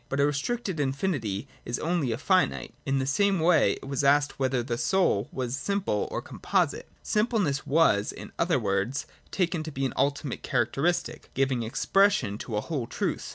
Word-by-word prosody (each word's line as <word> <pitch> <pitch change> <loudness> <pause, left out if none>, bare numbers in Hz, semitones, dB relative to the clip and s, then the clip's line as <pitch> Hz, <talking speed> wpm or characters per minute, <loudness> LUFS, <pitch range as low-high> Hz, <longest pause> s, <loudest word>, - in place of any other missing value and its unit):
But 135 - -2
a 140 - +5
restricted 175 +6 -2
infinity 135 - -1 0.2
is 120 - -3
itself 165 - -2
only 155 -9 +1
a 115 - -1
finite. 185 +6 +1
In 135 0 +2
the 130 - 0
same 195 +8 +2
way 160 -2 +4
it - - -9
was 140 0 -1
asked 145 +1 +3
whether 130 -2 +1
the 120 0 -2
soul 125 - +2
was 125 -1 -3
simple 195 - -1
or - - -4
composite. - - -1
Simpleness 210 - 0
was, 135 -9 +3
in - - -10
other 170 -4 +2
words, 105 +3 -1 0.2
taken 175 -3 0
to 155 0 -6
be 135 -1 -2
an 130 - -2
ultimate 140 -1 -1
characteristic, 135 +8 -1
giving 135 -2 +1
expression 135 - +2
to 115 - -5
a - - 0
whole 135 -6 -3
truth. - - -3
140 Hz, 180 wpm, -27 LUFS, 125-175 Hz, 0.2 s, a